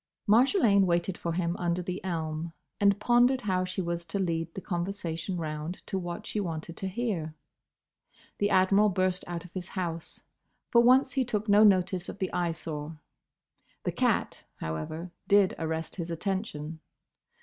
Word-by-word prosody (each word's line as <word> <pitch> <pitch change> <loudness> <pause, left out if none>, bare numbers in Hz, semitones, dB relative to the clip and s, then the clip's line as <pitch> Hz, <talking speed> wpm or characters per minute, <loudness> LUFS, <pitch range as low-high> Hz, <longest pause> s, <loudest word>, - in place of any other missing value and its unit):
Marjolaine 220 - +5
waited 175 +1 +1
for 170 -1 -3
him 170 0 0
under 175 0 -1
the 180 +1 -4
elm, 165 -2 -3 0.3
and 200 0 +4
pondered 245 +3 +4
how 185 -4 0
she 185 +1 -2
was 170 0 -2
to 165 +4 -2
lead 165 -3 -1
the - - -3
conversation 175 -1 -3
round 155 +1 -5
to 190 - -2
what 175 +4 -5
she 215 - -2
wanted 165 -3 -4
to 190 - -3
hear. 190 -7 -2 1.0
The 205 - +2
Admiral 195 +3 +5
burst 185 -1 0
out 175 0 -5
of 175 - -13
his 185 -1 -5
house. 170 -4 -4 0.5
For 235 - +7
once 255 +2 +5
he 265 +1 +1
took 220 -3 -2
no 205 +1 +6
notice 185 -2 +3
of - - -7
the 190 -2 -3
Eyesore. 160 -3 -3 0.9
The - - 0
cat, - - 0
however, 80 - -5 0.2
did 200 -2 +5
arrest 160 +1 -3
his 170 -2 -4
attention. 165 -3 -3
180 Hz, 160 wpm, -29 LUFS, 165-200 Hz, 1.0 s, For